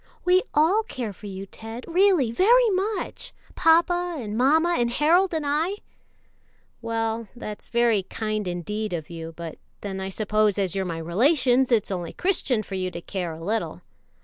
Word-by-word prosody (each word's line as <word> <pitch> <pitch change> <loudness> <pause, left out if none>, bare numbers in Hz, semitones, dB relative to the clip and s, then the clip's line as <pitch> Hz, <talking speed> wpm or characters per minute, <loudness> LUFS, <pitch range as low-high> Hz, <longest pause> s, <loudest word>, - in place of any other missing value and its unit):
"We 365 +1 +5
all 330 +9 +4
care 250 - -5
for 205 - -11
you, 195 0 -6
Ted, 225 +4 -9
really, 350 - +3
very 460 - +4
much 395 +2 -3 0.2
papa 345 +2 +3
and 215 -5 -5
mamma 315 +8 +3
and 240 0 +2
Harold 335 +9 +3
and 315 -3 -2
I." 310 +7 0 1.1
"Well, 225 -1 -2
that's 215 -3 -7
very 235 -3 +3
kind 215 +1 -3
indeed 205 +4 -3
of 160 -1 -5
you; 165 -1 -7
but 165 -2 -7 0.2
then 195 -2 -5
I 190 0 -4
suppose, 215 0 +1
as 195 -3 0
you're 190 -1 -1
my 170 -2 -4
relations, 250 - +2
it's 215 -4 +2
only 175 -3 -4
Christian 275 - 0
for 195 - -10
you 185 -1 -1
to 175 - -7
care 175 -1 -4
a 160 +1 -9
little." 220 +5 -2
225 Hz, 170 wpm, -25 LUFS, 195-320 Hz, 1.1 s, We